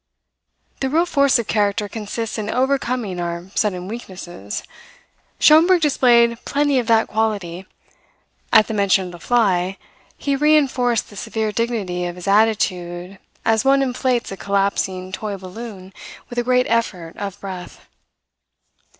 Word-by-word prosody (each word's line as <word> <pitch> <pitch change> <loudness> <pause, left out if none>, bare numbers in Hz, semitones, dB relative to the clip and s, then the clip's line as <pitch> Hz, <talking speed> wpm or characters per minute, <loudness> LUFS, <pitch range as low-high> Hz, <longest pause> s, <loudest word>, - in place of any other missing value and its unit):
If 265 -1 -1
real 330 +3 +3
force 280 -5 +3
of 235 - -2
character 205 0 0
consists 220 +2 -4
in 210 0 -3
overcoming 250 -7 -1
our 170 +2 -5
sudden 185 -4 -1
weaknesses, 180 - -7 0.8
Schomberg 335 +4 +6
displayed 235 -5 +4
plenty 285 -2 +1
of 240 - -3
that 225 -1 +4
quality. 195 -5 -2 0.8
At 215 - +7
the 225 - -5
mention 200 -2 +2
of 180 - -7
the 175 - -11
fly, 195 -4 +1 0.4
he 280 -1 -1
re 300 +2 +4
enforced 250 -6 0
the - - -12
severe 220 +2 -2
dignity 210 -6 -2
of 175 - -6
his 180 +1 -9
attitude 190 -3 +1 0.3
as 225 0 +3
one 275 0 +4
inflates 250 -2 -1
a 195 - -6
collapsing 195 -2 -1
toy 205 0 -4
balloon 190 0 -9 0.4
with 245 - -2
a - - 0
great 250 +1 +2
effort 190 -8 -1
of 200 -2 -5
breath. 185 -2 -9
215 Hz, 140 wpm, -20 LUFS, 185-245 Hz, 0.8 s, At